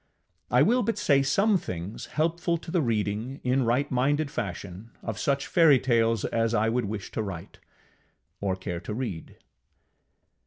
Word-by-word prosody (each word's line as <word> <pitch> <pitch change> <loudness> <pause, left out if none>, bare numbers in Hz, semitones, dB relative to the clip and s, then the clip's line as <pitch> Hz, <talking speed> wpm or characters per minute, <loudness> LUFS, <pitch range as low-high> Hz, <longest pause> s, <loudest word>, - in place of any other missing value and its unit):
I - - +5
will 250 +2 +3
but 230 -1 -1
say 140 -1 +3
some 195 +9 +3
things 90 - -6
helpful 170 +2 +1
to 165 - -9
the 175 - +2
reading, 115 +1 -1
in 130 0 +2
right 125 +5 +1
minded 140 +3 +1
fashion, 100 - -5
of 110 -3 -4
such 140 -1 0
fairytales 120 - +3
as 115 0 0
I 110 +1 +2
would 120 0 0
wish 100 -1 -5
to - - -2
write, 95 -5 -7 0.8
or 95 -2 -1
care 90 -2 -5
to 105 +4 -6
read. 110 -10 -5
120 Hz, 155 wpm, -27 LUFS, 105-145 Hz, 0.8 s, I